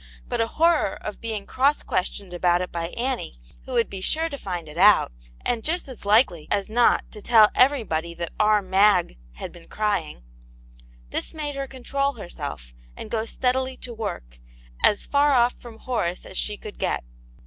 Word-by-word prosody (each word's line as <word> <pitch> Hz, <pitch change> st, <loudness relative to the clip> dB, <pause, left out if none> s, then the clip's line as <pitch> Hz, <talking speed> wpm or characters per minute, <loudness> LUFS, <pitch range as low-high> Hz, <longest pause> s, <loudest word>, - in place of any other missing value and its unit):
But -, -, -1 dB
a 225 Hz, -, +1 dB
horror 320 Hz, -, +2 dB
of 210 Hz, -, -7 dB
being 220 Hz, -3 st, -4 dB
cross 280 Hz, +3 st, +2 dB
questioned 185 Hz, 0 st, -2 dB
about 175 Hz, 0 st, +2 dB
it 180 Hz, -, -4 dB
by 170 Hz, -1 st, -3 dB
Annie, 245 Hz, -, -2 dB
v/ho 255 Hz, -, -12 dB
would 235 Hz, -2 st, +2 dB
be 195 Hz, -, -7 dB
sure 320 Hz, +11 st, 0 dB
to 285 Hz, -, -6 dB
find 175 Hz, -4 st, -5 dB
it 150 Hz, +3 st, -8 dB
out, 205 Hz, -, +6 dB, 0.3 s
and 235 Hz, -2 st, 0 dB
just 345 Hz, +1 st, -1 dB
as 255 Hz, -6 st, -10 dB
likely 205 Hz, -, +3 dB
as 200 Hz, 0 st, 0 dB
not 240 Hz, +1 st, +4 dB
to 210 Hz, -, -10 dB
tell 220 Hz, -1 st, +6 dB
everybody 200 Hz, -, +2 dB
that 170 Hz, 0 st, -5 dB
"pur 210 Hz, -1 st, +4 dB
Mag" 190 Hz, -, +3 dB
had -, -, -7 dB
been 170 Hz, -1 st, -15 dB
crying, 200 Hz, -, -2 dB, 0.4 s
— -, -, -25 dB
this -, -, -3 dB
made 295 Hz, -2 st, -3 dB
her 275 Hz, 0 st, -4 dB
control 275 Hz, +2 st, -1 dB
herself, 145 Hz, -, -7 dB, 0.2 s
and -, -, -8 dB
go 225 Hz, -1 st, -1 dB
steadily 260 Hz, +2 st, -1 dB
to 245 Hz, -, -7 dB
work, 175 Hz, -, -6 dB, 0.4 s
as 205 Hz, -, +3 dB
far 285 Hz, 0 st, +3 dB
off 245 Hz, -1 st, +4 dB
from 235 Hz, -2 st, -11 dB
Horace 185 Hz, -8 st, -2 dB
as -, -, -10 dB
she 210 Hz, +2 st, -1 dB
could 210 Hz, 0 st, -10 dB
get. -, -, -1 dB
210 Hz, 185 wpm, -24 LUFS, 175-255 Hz, 0.4 s, out